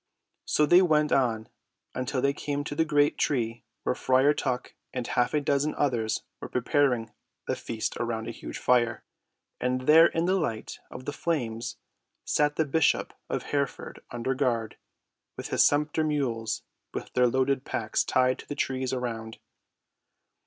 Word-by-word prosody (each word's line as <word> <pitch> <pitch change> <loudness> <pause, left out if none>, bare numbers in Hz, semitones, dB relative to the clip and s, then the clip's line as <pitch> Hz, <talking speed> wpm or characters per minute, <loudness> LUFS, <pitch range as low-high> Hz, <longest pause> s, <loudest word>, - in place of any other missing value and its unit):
So 150 - +3
they 175 +5 +7
went 150 -4 +3
on 115 -5 +1 0.5
until 130 +1 -2
they 140 0 +3
came 145 0 -3
to 145 - -5
the 160 - +2
great 145 -2 +2
tree 120 -4 0 0.2
where - - +1
Friar 130 +3 +3
Tuck 125 -4 -2 0.2
and 125 -2 -3
half 120 +1 +1
a - - +4
dozen 145 +1 +1
others 120 -6 0 0.2
were - - -7
preparing 125 -3 +1 0.3
the - - -1
feast 110 -2 -4
around 115 -2 -2
a - - -3
huge - - -7
fire. 120 -2 +2 0.6
And 125 0 0
there 160 +5 +7
in 165 +1 -1
the 185 - +2
light 115 -9 -3
of 130 - -9
the 145 - -3
flames 120 -9 -2 0.5
sat 145 0 +2
the 160 - +1
bishop 150 +2 +2 0.2
of - - -2
Hereford 140 -2 -3
under 120 +2 -2
guard, 120 -5 -1 0.6
with - - -6
his - - +4
sumpter 150 +2 +2
mules 130 -7 -1 0.3
with - - -5
their 125 0 +4
loaded 130 +2 +1
packs 110 -5 -1
tied 130 0 +2
to - - -11
the 145 - -4
trees 130 -2 -1
around. 115 -3 -4
130 Hz, 160 wpm, -28 LUFS, 120-145 Hz, 0.6 s, they